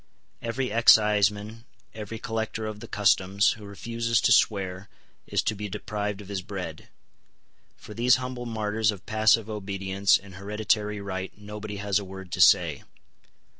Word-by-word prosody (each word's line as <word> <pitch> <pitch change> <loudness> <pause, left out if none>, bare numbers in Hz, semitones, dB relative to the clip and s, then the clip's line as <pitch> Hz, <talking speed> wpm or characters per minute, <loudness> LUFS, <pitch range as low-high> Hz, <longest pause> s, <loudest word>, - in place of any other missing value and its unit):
Every 125 +2 -2
exciseman, 105 0 +3 0.3
every 110 0 -7
collector 110 0 -3
of 110 -1 -5
the 115 - -9
customs, 100 0 +3
who 110 -2 -8
refuses 115 +3 -1
to - - +3
swear, 95 -2 +2 0.4
is - - 0
to - - 0
be 105 0 -6
deprived 105 +1 -4
of 100 - -12
his 100 -2 -4
bread. 90 -5 -7 0.9
For 105 - -11
these 120 +2 +4
humble 125 -1 -5
martyrs 110 -1 0
of 100 -3 -3
passive 110 0 +3
obedience 100 -2 +1
and 100 -1 -14
hereditary 105 +1 -1
right 95 -1 -5
nobody 105 0 -7
has 100 0 0
a - - -6
word 95 -1 -10
to - - -1
say. - - +5
105 Hz, 150 wpm, -26 LUFS, 100-110 Hz, 0.9 s, say